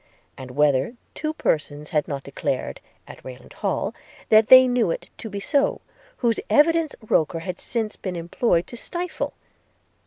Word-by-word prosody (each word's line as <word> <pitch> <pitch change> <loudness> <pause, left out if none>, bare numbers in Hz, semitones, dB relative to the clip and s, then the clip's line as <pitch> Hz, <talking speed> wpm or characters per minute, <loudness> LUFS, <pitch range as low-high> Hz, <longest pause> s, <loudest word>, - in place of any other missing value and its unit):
and 130 -1 -9
whether 140 - +2 0.2
two 310 0 -3
persons 150 - -2
had 150 -2 +1
not 140 -2 -4
declared, 140 -1 -3 0.3
at - - -12
Rayland 125 -1 -11
Hall, - - -2 0.4
that 215 0 +6
they 255 0 +9
knew 245 -6 +2
it - - -4
to 225 - -6
be 200 0 -5
so, 280 +7 +1 0.4
whose 235 -3 +1
evidence 320 +1 +3
Roker 165 -1 +1
had 180 +1 -5
since 225 -3 -3
been 185 -2 -5
employed 170 +1 0
to - - -10
stifle?' 350 +8 -4
190 Hz, 155 wpm, -23 LUFS, 150-250 Hz, 0.4 s, they